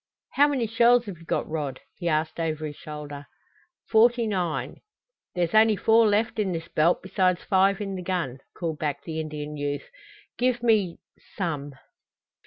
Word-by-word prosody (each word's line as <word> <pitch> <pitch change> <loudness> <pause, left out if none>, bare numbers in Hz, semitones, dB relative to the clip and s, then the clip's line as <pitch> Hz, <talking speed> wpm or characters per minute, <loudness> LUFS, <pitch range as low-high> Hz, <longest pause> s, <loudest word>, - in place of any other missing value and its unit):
"How 290 +1 +5
many 270 -5 0
shells 235 +2 +4
have 190 -6 -8
you 165 - -15
got, - - -1
Rod?" 150 -4 -3
he 175 -2 -3
asked 155 +1 -1
over 155 -1 -2
his 150 -1 -6
shoulder. 145 -2 -8 0.6
"Forty 235 +1 +4
nine." 180 -6 -2 0.6
"There's 175 -2 0
only 220 0 +6
four 225 +3 +4
left 215 +2 +1
in 195 -4 0
this 165 0 -5
belt 165 +3 +2
besides 185 -1 +1
five 195 0 +3
in 200 -2 -4
the 185 - -4
gun," 170 -8 -2 0.2
called 165 -3 -3
back 145 -2 -2
the 160 -1 -4
Indian 150 -1 -5
youth. 145 - -4 0.5
"Give 245 -1 +1
me 210 -7 +2 0.4
some." 145 -7 -3
180 Hz, 165 wpm, -26 LUFS, 155-220 Hz, 0.6 s, only